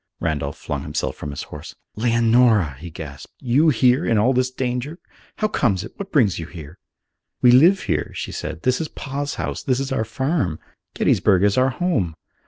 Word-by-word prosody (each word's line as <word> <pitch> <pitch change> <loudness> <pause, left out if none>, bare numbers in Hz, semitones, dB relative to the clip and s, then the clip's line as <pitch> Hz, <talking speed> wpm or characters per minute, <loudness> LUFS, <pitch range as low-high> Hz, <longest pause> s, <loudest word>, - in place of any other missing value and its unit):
Randolph 75 -3 -2
flung - - -4
himself - - -3
from 75 - -7
his 70 - -5
horse. 75 +1 -10 0.2
"Leonora!" 115 - +3
he 85 +2 -8
gasped. 75 -4 -9
"You 135 +6 +3
here! 130 +2 +3
In 115 - +2
all 120 +6 +3
this 130 0 +1
danger! 130 +4 -3 0.4
How 215 - 0
comes 105 - 0
it? - - -10
What 200 0 -7
brings 110 - +3
you 80 - -6
here?" 85 0 -11 0.6
"We 125 - +8
live 170 +10 +6
here," - - -2
she - - -4
said. 80 - -6
"This 130 +3 +1
is 160 - -2
Pa's 140 0 -5
house. - - -4
This 130 -1 0
is 135 0 -3
our 120 -4 0
farm. 115 - -1 0.4
Gettysburg 95 -2 +3
is 100 -1 +3
our 130 +1 +3
home. 125 - -1
120 Hz, 190 wpm, -22 LUFS, 90-135 Hz, 0.6 s, We